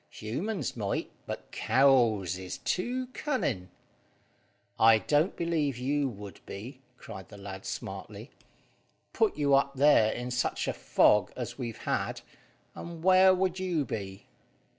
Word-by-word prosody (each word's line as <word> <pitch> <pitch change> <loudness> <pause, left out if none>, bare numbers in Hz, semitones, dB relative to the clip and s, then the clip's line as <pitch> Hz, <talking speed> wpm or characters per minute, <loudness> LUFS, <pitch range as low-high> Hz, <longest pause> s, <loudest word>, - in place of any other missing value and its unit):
Humans 180 - -4
might, 105 -4 -2 0.2
but - - -7
cows 120 -9 +3
is 95 0 -6
too 250 +7 -2
cunning." 130 - -2 1.1
"I 110 0 +7
don't 150 - +1
believe 160 -6 -1
you 140 +2 0
would 100 -3 -10
be," 125 +7 -8 0.2
cried 95 -4 -10
the 105 - -11
lad 95 -1 -8
smartly. - - -7 0.8
"Put 220 -7 +1
you 145 -2 +2
up 140 0 +3
there 135 -6 +5
in 125 +1 -5
such 125 0 -1
a - - 0
fog 90 +11 +3
as 125 +2 -6
we've 120 -3 -4
had, - - -2 0.5
and 170 -1 -8
where 185 0 +7
would 185 0 0
you 175 -6 0
be?" 100 -4 -6
130 Hz, 135 wpm, -29 LUFS, 105-165 Hz, 1.1 s, I